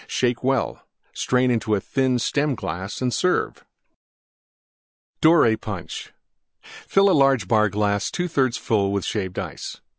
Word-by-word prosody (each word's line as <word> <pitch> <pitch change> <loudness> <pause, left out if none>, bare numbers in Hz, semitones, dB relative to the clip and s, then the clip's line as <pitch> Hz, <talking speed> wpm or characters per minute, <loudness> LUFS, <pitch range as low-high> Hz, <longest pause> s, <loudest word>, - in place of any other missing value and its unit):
Shake 120 -1 -1
well; 130 -2 -1 0.3
strain 125 0 +1
into 110 -3 0
thin 130 +4 0
Stem 140 +3 0
glass 95 +6 -5
and 125 -1 0
serve. 180 0 0 1.6
DORAY 155 -9 +5
PUNCH 100 -5 -7 0.5
Fill 195 -1 +1
large 135 -8 +3
Bar 110 +1 +3
glass 100 0 0
2/3 140 -9 0
full 100 -2 0
Shaved 95 -2 -3
Ice. - - -6
120 Hz, 115 wpm, -23 LUFS, 105-135 Hz, 1.6 s, DORAY